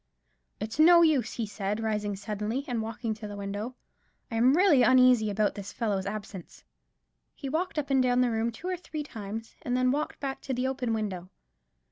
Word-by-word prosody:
"It's 220 Hz, +6 st, -5 dB
no 340 Hz, +2 st, +8 dB
use," 290 Hz, -8 st, +2 dB
he 230 Hz, -, -2 dB
said, 205 Hz, 0 st, -3 dB
rising 210 Hz, -2 st, -1 dB
suddenly, 210 Hz, +6 st, -3 dB
and 240 Hz, -3 st, -1 dB
walking 225 Hz, 0 st, -3 dB
to 215 Hz, 0 st, -8 dB
the 205 Hz, -, -7 dB
window; 205 Hz, +5 st, -5 dB, 0.6 s
"I -, -, -3 dB
am 255 Hz, +6 st, +4 dB
really 355 Hz, -8 st, +5 dB
uneasy 250 Hz, -2 st, +5 dB
about 205 Hz, +1 st, +1 dB
this 200 Hz, 0 st, -7 dB
fellow's 200 Hz, -5 st, -2 dB
absence." 200 Hz, -3 st, -7 dB, 0.7 s
He 275 Hz, -, -6 dB
walked 325 Hz, +4 st, -2 dB
up 285 Hz, -2 st, -2 dB
and 265 Hz, -1 st, +4 dB
down 250 Hz, 0 st, +3 dB
the 245 Hz, -1 st, +2 dB
room 225 Hz, +1 st, 0 dB
two 275 Hz, +11 st, -8 dB
or 370 Hz, -1 st, -1 dB
three 315 Hz, -3 st, -6 dB
times, 225 Hz, -3 st, -7 dB
and 250 Hz, 0 st, -1 dB
then 255 Hz, 0 st, +3 dB
walked 295 Hz, +3 st, -2 dB
back 270 Hz, -1 st, -4 dB
to 265 Hz, -, -3 dB
the 250 Hz, +1 st, -1 dB
open 255 Hz, -4 st, -1 dB
window. 190 Hz, -5 st, -4 dB
230 Hz, 195 wpm, -28 LUFS, 210-265 Hz, 0.7 s, no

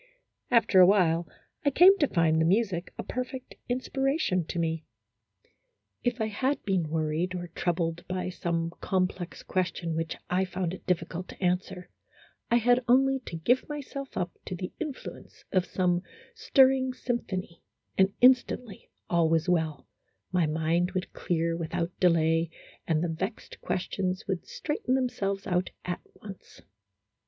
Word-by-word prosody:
After 230 Hz, -5 st, +5 dB
a 180 Hz, -, +10 dB
while 175 Hz, -4 st, +3 dB, 0.4 s
I 285 Hz, -, +4 dB
came 360 Hz, +7 st, +7 dB
to 290 Hz, -, +4 dB
find 160 Hz, -5 st, +2 dB
the -, -, +4 dB
music 185 Hz, 0 st, +1 dB
a -, -, -4 dB
perfect 255 Hz, +1 st, -5 dB, 0.2 s
inspiration 265 Hz, -, 0 dB
to 170 Hz, -, -5 dB
me. 165 Hz, -1 st, -1 dB, 1.2 s
If 245 Hz, 0 st, 0 dB
I 220 Hz, -, +1 dB
had 255 Hz, +7 st, -1 dB
been 185 Hz, -6 st, 0 dB
worried 160 Hz, +3 st, -1 dB
or 175 Hz, -1 st, -5 dB
troubled 170 Hz, 0 st, -1 dB
by 185 Hz, 0 st, -2 dB
some 170 Hz, -2 st, -2 dB
complex 185 Hz, -2 st, -1 dB
question 170 Hz, -3 st, -1 dB
which 165 Hz, 0 st, -2 dB
I 185 Hz, +1 st, +1 dB
found 180 Hz, -1 st, -2 dB
it -, -, -10 dB
difficult 180 Hz, 0 st, -1 dB
to -, -, -12 dB
answer, 180 Hz, 0 st, -1 dB, 0.6 s
I 235 Hz, -, +4 dB
had 245 Hz, +1 st, +4 dB
only 270 Hz, +2 st, +4 dB
to -, -, -5 dB
give 245 Hz, -, +1 dB
myself 275 Hz, -2 st, -6 dB
up 175 Hz, 0 st, -1 dB
to 185 Hz, -, -4 dB
the 180 Hz, +1 st, -6 dB
influ 300 Hz, -4 st, -5 dB
ence -, -, -20 dB
of 185 Hz, -2 st, +2 dB
some 180 Hz, -1 st, +1 dB, 0.3 s
stirring 265 Hz, -, +4 dB
symphony, 190 Hz, -9 st, -4 dB, 0.3 s
and 190 Hz, 0 st, +4 dB
instantly 250 Hz, -4 st, +3 dB, 0.2 s
all 170 Hz, -2 st, +3 dB
was 165 Hz, +1 st, +2 dB
well, 160 Hz, -4 st, 0 dB, 0.4 s
my 180 Hz, -3 st, +2 dB
mind 165 Hz, +3 st, +1 dB
would 185 Hz, -1 st, -3 dB
clear 165 Hz, -1 st, 0 dB
without 165 Hz, +1 st, -2 dB
delay, 165 Hz, -2 st, +3 dB, 0.4 s
and 160 Hz, -1 st, +2 dB
the -, -, +1 dB
vexed 185 Hz, +7 st, -5 dB
questions 185 Hz, 0 st, -2 dB
would 190 Hz, -3 st, -3 dB
straighten 295 Hz, -4 st, -1 dB
themselves 200 Hz, -7 st, -1 dB
out 180 Hz, 0 st, 0 dB, 0.2 s
at 180 Hz, -1 st, -3 dB
once. 195 Hz, -3 st, -12 dB
185 Hz, 150 wpm, -28 LUFS, 170-240 Hz, 1.2 s, a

